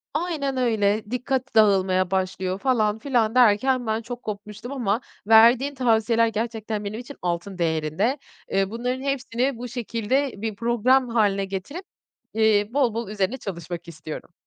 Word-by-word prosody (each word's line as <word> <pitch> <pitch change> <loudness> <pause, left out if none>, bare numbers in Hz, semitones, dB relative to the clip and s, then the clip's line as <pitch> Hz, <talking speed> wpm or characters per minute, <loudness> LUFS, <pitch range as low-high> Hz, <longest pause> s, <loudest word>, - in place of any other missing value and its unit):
Aynen 305 -5 -1
öyle, 220 -4 +1
dikkat 260 +1 -2
dağılmaya 190 -4 +3
başlıyor 190 0 -1
falan 220 -5 +1
filan 235 -3 +1
derken 245 +1 +4
ben 220 +1 0
çok 245 +2 -8
kopmuştum 210 +3 -7
ama 235 -4 -1 0.3
verdiğin 235 +5 +6
tavsiyeler 230 -2 +2
gerçekten 220 -1 -3
benim 210 +2 -4
için 250 +3 -10
altın 175 +2 -3
değerinde. 165 - 0 0.3
Eee, 195 0 +1
bunların 250 +4 -3
hepsini 265 -2 -1
bu 245 +1 -6
şekilde 240 +3 -1
bir 220 0 -4
program 240 +3 +2
hâline 205 -4 +2
getirip, 195 - -6 0.5
eee, 215 -2 +3
bol 265 -6 +2
bol 230 -2 -4
üzerine 210 +4 -1
çalışmak 175 -5 -7
istiyorum. 155 +1 -9
225 Hz, 140 wpm, -24 LUFS, 200-250 Hz, 0.5 s, verdiğin